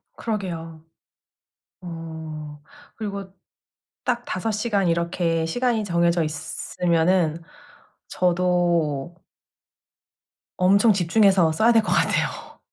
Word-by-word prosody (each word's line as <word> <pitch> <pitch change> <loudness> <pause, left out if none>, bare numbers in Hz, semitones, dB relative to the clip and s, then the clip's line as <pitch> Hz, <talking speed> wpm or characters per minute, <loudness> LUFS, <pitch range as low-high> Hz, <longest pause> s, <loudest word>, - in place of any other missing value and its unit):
그러게요. 170 -7 -5 1.0
어. 160 -3 -8 0.3
그리고 200 -3 -6 0.7
딱 245 -1 -1
5 185 +4 -2
시간 210 -3 0
이렇게 170 -1 0
시간이 235 +5 0
정해져 170 -2 +2
있으면은 165 +2 0 0.7
저도 175 -4 0 1.5
엄청 200 +5 +5
집중해서 190 -2 +3
써야 220 +9 +4
될 225 -1 +5
것 215 - -1
같아요. - - -1
175 Hz, 185 characters per minute, -23 LUFS, 165-200 Hz, 1.5 s, 엄청